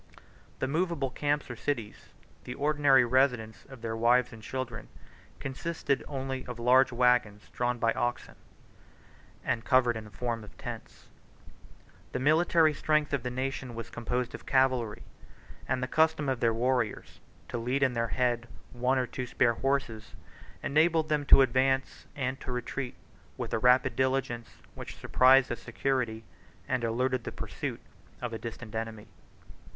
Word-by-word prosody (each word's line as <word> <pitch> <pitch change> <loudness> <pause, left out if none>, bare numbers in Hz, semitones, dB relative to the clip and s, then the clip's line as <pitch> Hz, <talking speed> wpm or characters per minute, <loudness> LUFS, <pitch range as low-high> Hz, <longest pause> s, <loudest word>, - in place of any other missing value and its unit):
The 130 - -1
movable 155 -3 -1
camps 145 +2 -1
or - - -6
cities, 115 -3 -4 0.3
the - - -6
ordinary 145 -3 +4
residence 125 -3 +1
of 130 -4 -13
their 115 -1 -2
wives 120 +2 +3
and 115 - -11
children, 125 0 -5 0.5
consisted 140 0 -2
only 135 -2 -4
of 125 -1 -6
large 125 +3 +4
wagons 120 -4 +1
drawn 120 0 0
by 115 0 +2
oxen, 120 0 -2 1.1
and 115 - 0
covered 130 -3 +3
in 110 - -5
the - - -12
form 115 +1 -3
of 105 - -14
tents. - - -8 1.1
The - - -1
military 160 +2 +4
strength 155 0 +1
of 140 - +1
the 125 - -3
nation 130 -1 -4
was 115 0 -7
composed 120 +1 -2
of - - -9
cavalry; 130 -5 +1 0.6
and 130 0 0
the - - -1
custom 160 0 +2
of 130 -2 -1
their 115 -1 +3
warriors, 120 -1 -1 0.3
to 120 - -3
lead 125 +4 0
in 130 -2 +2
their 115 -1 0
hand 120 -1 0 0.3
one 125 +2 +1
or 130 - +1
two 125 0 -5
spare 120 0 +2
horses, 115 -5 -2 0.5
enabled 160 +1 +3
them 150 -1 +1
to 135 - +8
advance 130 +1 0
and 130 -1 -3
to - - -5
retreat 125 +1 -4 0.4
with - - -4
a 115 - +1
rapid 125 +1 +4
diligence, 130 -2 0 0.2
which - - -9
surprised 130 +1 +5
the - - -1
security, 120 -1 -2 0.4
and 130 -3 -1
eluded 125 +2 0
the - - -5
pursuit, - - -5 0.4
of 120 -2 -4
a 110 - -4
distant 115 -1 -8
enemy. 110 -1 -4
125 Hz, 155 wpm, -29 LUFS, 115-135 Hz, 1.1 s, to